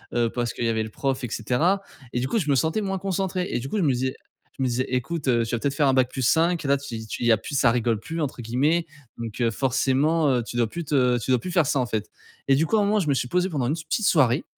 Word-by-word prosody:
heu, 120 -1 +1
parce 120 -1 -1
qu'il 120 - -3
y - - +2
avait 110 -1 0
le 110 - -4
prof, 135 +4 -2
et 125 - -3
cetera. 150 - +1 0.3
Et 120 - -1
du 130 - -1
coup, 225 - 0
je 155 -7 -2
me 140 - +4
sentais 160 - +1
moins 195 -1 -2
concentré 190 -1 -2
et - - 0
du 135 +3 -6
coup, 215 - -2
je 195 - +1
me 145 - +3
disais 130 +1 -2 0.4
je 135 - -1
me - - +2
disais: 125 +1 0
«Écoute, 135 +4 -2
heu, 120 -2 +2
tu 115 - -2
vas - - -3
peut 140 - 0
être - - -5
faire 145 0 +2
un 135 - +3
bac 130 -1 +3
plus 130 - -4
5 165 +5 +2
et - - -1
là, 140 - +4
tu 115 -5 -7
tu - - -6
il 120 - +2
y - - +6
a 110 - +5
plus 125 +8 -7
"ça 125 - +4
rigole 115 -1 +1
plus" 165 +8 -6
entre 140 -5 -3
guillemets. 145 +9 +1 0.3
Donc 115 -1 -6
heu, 115 -2 +2
forcément, 135 +5 +1
heu, 125 -3 +1
tu 120 - -6
dois 120 -1 +2
plus 170 +9 -5
te 130 -5 +2
tu 120 +2 -2
dois 125 - +4
plus 180 - -6
faire 170 -3 +3
ça, 140 - +1
en 125 - +1
fait». 110 -3 -3 0.4
Et 135 - +6
du 155 +4 +2
coup, 195 - 0
à - - +4
un - - +2
moment, 210 +1 +2
je 170 - -1
me 140 - +3
suis 125 -1 -1
posé 180 +4 +1
pendant 145 -9 -1
une 140 - +1
petite 165 +7 -2
soirée, 135 -2 +3
135 Hz, 325 wpm, -24 LUFS, 120-165 Hz, 0.4 s, y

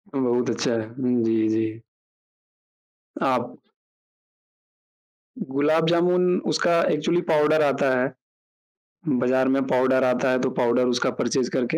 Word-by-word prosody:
बहुत 125 -1 0
अच्छा। 115 +1 -1 0.2
जी, 115 -3 +1
जी। 110 0 -2 1.4
आप - - -1 1.8
गुलाब 150 +4 0
जामुन 180 +1 +2
उसका 170 -1 +1
एक्चुअली 170 +4 0
पाउडर 155 0 +3
आता 140 -1 +1
है, 130 +2 -1 1.0
बाजार 130 +1 +1
में 135 - +1
पाउडर 130 +1 +2
आता 125 +1 +1
है 130 - +1
तो 130 - 0
पाउडर 125 +1 +2
उसका 125 0 0
परचेज़ 120 +1 -2
करके 130 +5 -1
130 Hz, 110 wpm, -23 LUFS, 125-150 Hz, 1.8 s, पाउडर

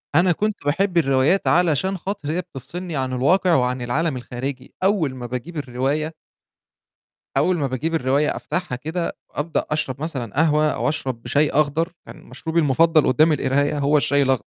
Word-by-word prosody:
أنا 175 +3 +5
كنت 210 +5 0
باحب 175 +5 +1
الروايات 135 +4 +3
علشان 180 +2 +2
خاطر 190 -4 -4
هي 175 +3 0
بتفصِلني 170 +2 -7
عن 130 -2 -2
الواقع 170 +8 +3
وعن 125 -1 +1
العالم 135 +4 -1
الخارجي، 125 +2 -6
أول 185 -9 +1
ما 125 -1 -7
باجيب 125 +8 -6
الرواية 140 +4 -2 1.2
أول 185 - +3
ما 145 -4 0
باجيب 135 +6 -2
الرواية 145 0 +1
أفتحها 180 -8 -3
كده، 160 +6 -3
وأبدأ 160 +3 -2
أشرب 150 -3 -2
مثلًا 130 -9 -4
قهوة 155 0 +3
أو - - -1
أشرب 130 -5 -3
شاي 145 +1 +2
أخضر، 155 +4 +1
كان - - -12
مشروبي 165 0 -2
المفضَّل 155 +2 +4
قُدّام 155 +4 +4
القراية، 145 +1 +1
هو 145 +1 +3
الشاي 140 -1 +2
الأخض 130 -5 +1
150 Hz, 160 wpm, -22 LUFS, 130-165 Hz, 1.2 s, أنا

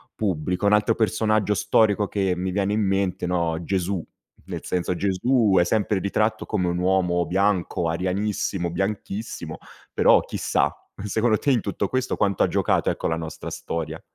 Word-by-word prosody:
pubblico? 90 -1 -1
Un 105 - +4
altro 105 +2 +3
personaggio 110 -2 +1
storico 105 +2 +2
che 95 -2 0
mi 90 +1 -2
viene 100 +1 0
in 110 - +1
mente 95 -2 0
no, 85 -2 0
Gesù, 95 0 -1 0.4
nel - - -6
senso 90 0 -1
Gesù, 100 +3 +2
è 85 - +4
sempre 105 0 +1
ritratto 110 +3 0
come 90 -1 -1
un 85 - -1
uomo 90 -1 +1
bianco, 95 -2 0
arianissimo, 95 +1 -1
bianchissimo 100 +3 -4 0.4
però, - - +5
chissà, - - 0 0.3
secondo 110 +2 +1
te 140 - +1
in 125 - +3
tutto 100 -1 -2
questo 130 -1 -1
quanto 100 -2 +1
ha - - +3
giocato - - +1
ecco, - - -2
la 80 - -1
nostra 80 -1 -6
storia? 80 -1 -5
95 Hz, 160 wpm, -24 LUFS, 90-105 Hz, 0.4 s, però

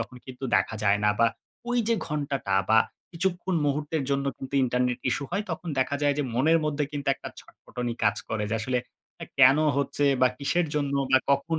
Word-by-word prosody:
তখন 115 +2 -6
কিন্তু 130 0 -8
দেখা - - 0
যায় 100 0 +4
না। 105 - +5
বা 115 - +5 0.4
ঐযে 235 -2 +1
ঘন্টাটা 140 -9 -2 0.2
বা 110 - +7 0.3
কিছুক্ষণ 180 +1 -1
মুহূর্তের 150 +2 -1
জন্য 140 0 +1
কিন্তু 135 +1 -7
ইন্টারনেট 125 0 0
ইসূ 130 +4 -1
হয় 200 +4 -1
তখন 165 +2 -5
দেখা 130 +2 +1
যায় 145 -1 +3
যে, - - +2
মনের 155 +7 +4
মধ্যে 150 -1 0
কিন্তু 145 -1 -3
একটা - - -8
ছটফটানি 120 -1 -6
কাজ 105 -1 +3
করে। 110 -1 -2
যে - - 0
আসলে 125 +3 0 0.4
আ - - -3
কেন 135 +1 +8 0.2
হচ্ছে 140 +1 0 0.2
বা 130 - +6
কিসের 165 +5 +1
জন্য 140 -2 0 0.2
বা 130 - +7
কখন 140 +4 +1
140 Hz, 190 wpm, -26 LUFS, 125-150 Hz, 0.4 s, কেন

